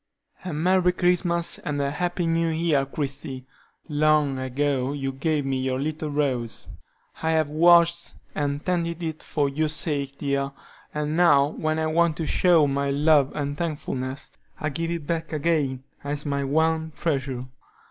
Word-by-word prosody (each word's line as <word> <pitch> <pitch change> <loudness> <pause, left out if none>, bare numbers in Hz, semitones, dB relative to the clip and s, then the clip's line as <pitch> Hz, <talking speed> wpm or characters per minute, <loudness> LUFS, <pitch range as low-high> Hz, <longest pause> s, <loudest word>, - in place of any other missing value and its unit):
"A 185 - -4
merry 180 +3 +2
Christmas 175 -1 +1
and 145 -1 -3
a 140 0 0
happy 175 +3 -1
New 165 0 +1
Year, 160 -4 +1
Christie! 135 -2 -4 0.4
Long 150 -3 +2
ago 135 0 -1
you 135 -2 -2
gave 145 +2 -1
me 135 -1 -1
your 130 0 -1
little 155 +2 -3
rose; 130 -6 -2 0.5
I 160 - 0
have 155 -2 +1
watched 170 +1 +4 0.2
and 145 0 -2
tended 170 -2 -1
it 160 -1 -4
for 145 -2 0
your 150 +3 0
sake, 145 -3 -1
dear, 140 -1 -1 0.4
and 150 +1 -2
now 145 -5 +5
when 155 0 -2
I 160 - 0
want 160 0 +2
to 165 - -2
show 170 -1 +4
my 140 0 0
love 145 0 +4
and 145 -1 -2
thankfulness, 145 -4 -4 0.3
I 155 - -1
give 165 +4 -3
it 170 -3 -3
back 165 +1 -2
again 150 -4 0 0.2
as 145 +1 -4
my 140 -1 -1
one 160 +2 +1
treasure. 135 -6 -2
150 Hz, 160 wpm, -25 LUFS, 140-165 Hz, 0.5 s, now